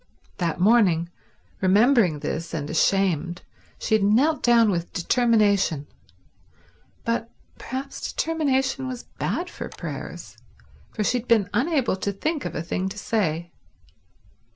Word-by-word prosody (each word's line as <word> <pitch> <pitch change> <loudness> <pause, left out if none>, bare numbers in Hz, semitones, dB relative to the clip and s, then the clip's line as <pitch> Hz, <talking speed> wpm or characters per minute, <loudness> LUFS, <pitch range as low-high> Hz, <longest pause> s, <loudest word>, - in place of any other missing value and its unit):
That 170 -2 -1
morning, 185 -5 +4 0.5
remembering 200 - +4
this 165 +3 -4
and 145 -2 -4
ashamed, 175 0 +1 0.3
she - - -2
had 215 -2 +4
knelt 260 +10 +3
down 230 -3 +5
with 170 -2 -3
determination; 200 - +2 1.2
but 230 0 -1 0.3
perhaps 270 +2 -5
determination 270 -4 0
was 250 -2 -5
bad 355 - -3
for - - -7
prayers, - - -8 0.5
for 215 - -3
she 245 +4 +1
had 245 - -11
been 210 -5 +3
unable 265 - +1
to 200 +1 -2
think 300 - -2
of - - -4
a 155 - -2
thing 185 +3 -2
to 205 - -9
say. 170 -6 -1
210 Hz, 130 wpm, -24 LUFS, 175-250 Hz, 1.2 s, down